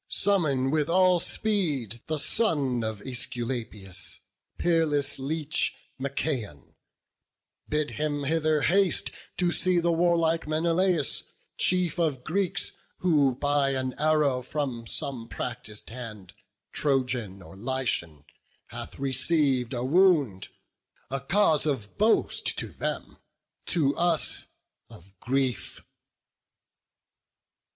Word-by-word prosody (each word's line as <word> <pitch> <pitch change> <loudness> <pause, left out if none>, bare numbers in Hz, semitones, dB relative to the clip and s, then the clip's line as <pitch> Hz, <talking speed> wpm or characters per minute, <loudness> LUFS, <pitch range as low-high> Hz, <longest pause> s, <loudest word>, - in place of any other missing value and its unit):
summon 145 -10 +2
with 150 -1 +1
all 180 0 +5
speed 150 - 0
The 155 -1 -1
son 145 - +1
of 110 -2 -3
Æsculapius, 120 -6 -4 0.4
peerless 150 -5 +2
leech, 150 +2 -1 0.2
Machaon; 130 - -3 1.0
bid 150 0 0
him 145 -1 -2
hither 155 +1 +2
haste 190 +5 +2 0.3
to 175 -1 +2
see 185 0 +2
The 170 0 +2
warlike 165 -1 +2
Menelaus, 165 +1 +1 0.3
chief 180 -1 +1
of 145 -7 0
Greeks, 185 +4 -1 0.3
Who 145 -7 +3
by 145 0 +1
an 130 -1 -2
arrow 150 -4 +3
from 125 -3 -3
some 120 -3 -3
practis'd 110 -4 -5
hand, 110 -6 -9 0.4
Trojan 125 -9 0
or 95 - -13
Lycian, 110 - -2 0.5
hath - - -8
receiv'd 135 -1 +1
a 120 - -2
wound; 145 - +3 0.6
A 135 - -1
cause 155 +1 +3
of 120 -8 -2
boast 220 +2 +2
to - - -3
them, - - -4 0.5
to 145 -5 +2
us 170 -6 +1 0.4
of 95 +3 -15
grief." 130 -1 -1
140 Hz, 105 wpm, -27 LUFS, 125-165 Hz, 1.0 s, all